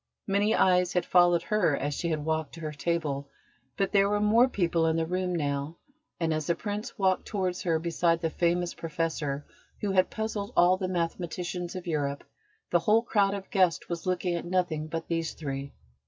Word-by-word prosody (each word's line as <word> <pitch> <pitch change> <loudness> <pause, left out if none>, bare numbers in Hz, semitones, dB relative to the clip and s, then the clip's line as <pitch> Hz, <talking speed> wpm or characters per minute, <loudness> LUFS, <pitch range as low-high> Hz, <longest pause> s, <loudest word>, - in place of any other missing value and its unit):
Many 205 +2 +2
eyes 180 -1 +3
had 180 - +1
followed 175 -1 +4
her 190 -9 +2
as 145 +2 -2
she 170 - -2
had 155 -2 -2
walked 160 -1 -1
to - - -10
her 155 -1 -3
table, 145 -2 -2 0.5
but 195 -1 0
there 200 -1 +4
were 205 0 +1
more 225 +5 +4
people 170 -6 +1
in 160 - +2
the 165 0 +1
room 180 +1 -1
now, 145 0 -2 0.4
and 165 -2 +1
as 155 -1 -2
the 170 - +2
Prince 210 +3 -5
walked 190 -2 +1
towards 185 -4 -2
her 165 -3 +1
beside 165 0 +1
the 165 -1 -1
famous 175 +1 0
Professor 160 -4 -3 0.3
who 205 - -1
had 185 -1 +3
puzzled 220 -2 -4
all 180 +1 +6
the 185 0 -3
mathematicians 175 0 -3
of 185 0 -6
Europe, 145 -4 -2 0.5
the 175 - +4
whole 215 +6 +3
crowd 200 -4 +2
of 195 -1 -8
guests 185 -5 +2
was 170 +1 -4
looking 180 -1 0
at 170 - -2
nothing 175 -4 -1
but 165 +1 -4
these 165 -1 -2
three. 140 -2 -5
175 Hz, 195 wpm, -28 LUFS, 160-190 Hz, 0.5 s, all